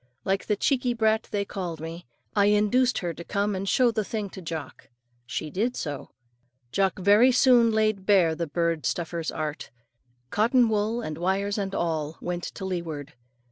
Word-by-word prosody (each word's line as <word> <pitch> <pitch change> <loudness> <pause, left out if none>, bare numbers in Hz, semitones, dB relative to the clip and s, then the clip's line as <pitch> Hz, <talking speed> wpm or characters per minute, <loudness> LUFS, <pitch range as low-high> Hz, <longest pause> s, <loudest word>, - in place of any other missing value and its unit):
Like 195 +1 0
the 210 - +2
cheeky 250 +2 +1
brat 220 -1 +1
they 205 -2 -1
called 175 -5 -5
me, 165 0 -7 0.3
I 200 -1 +4
induced 210 +5 +3
her 175 -2 -2
to 170 - -9
come 205 +2 -1
and 195 +1 -2
show 250 -2 +4
the 215 -1 -1
thing 205 -2 -4
to 190 - -9
Jock. 160 -5 -7 0.4
She 155 +3 -4
did 230 - -1
so. 145 -3 -5 0.6
Jock 195 +4 +1
very 205 +7 +5
soon 245 -2 +5
laid 215 -3 +1
bare 185 -6 +5
the 165 +1 -3
bird 165 0 0
stuffer's 170 -1 -2
art. 155 -2 -4 0.6
Cotton 235 +3 +3
wool 220 +2 0
and 155 -8 -5
wires 195 +3 0
and 195 -1 -3
all 160 -2 -2
went 175 0 -4
to 190 - -6
leeward. 165 -5 -4
195 Hz, 175 wpm, -26 LUFS, 170-215 Hz, 0.6 s, very